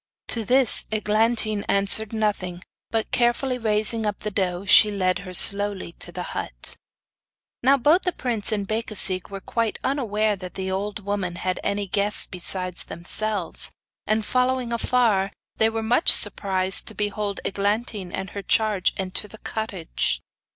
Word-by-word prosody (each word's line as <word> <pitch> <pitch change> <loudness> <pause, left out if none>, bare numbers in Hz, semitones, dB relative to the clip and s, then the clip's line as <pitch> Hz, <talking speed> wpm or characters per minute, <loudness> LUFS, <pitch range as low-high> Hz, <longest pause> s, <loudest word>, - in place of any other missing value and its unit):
To 230 - +1
this 255 +3 +3
Eglantine 215 0 0
answered 200 +2 +4
nothing; 200 -5 -3 0.3
but 225 -1 -2
carefully 250 +1 0
raising 220 0 +1
up 205 - -4
the 210 - -4
doe, 185 -1 -2
she 210 +2 +7
led 185 -3 0
her 185 -1 -9
slowly 200 -1 +2
to - - -2
the - - -5
hut. - - -6 0.9
Now 270 +3 +4
both 300 +8 +3
the 360 - -1
prince 235 - -3
and 205 -2 -2
Becasigue 215 -4 +1
were 195 -1 -7
quite 230 +2 -2
unaware 220 -6 0
that 185 -2 -10
the 190 0 -4
old 205 +1 -4
woman 200 -4 -3
had 185 +1 -2
any 200 0 -1
guests 200 +2 +1
besides 185 0 0
themselves, 195 +2 +2 0.4
and, 215 0 0
following 255 -1 0
afar, 225 -5 +1 0.3
were 225 0 +1
much 240 +8 +5
surprised 190 -1 +4
to - - -7
behold 205 -1 -3
Eglantine 205 -1 -2
and 195 +1 -5
her 200 - -6
charge 205 -1 +1
enter 190 +2 -2
the 220 - -14
cottage. 210 -7 -3
210 Hz, 150 wpm, -23 LUFS, 190-225 Hz, 0.9 s, she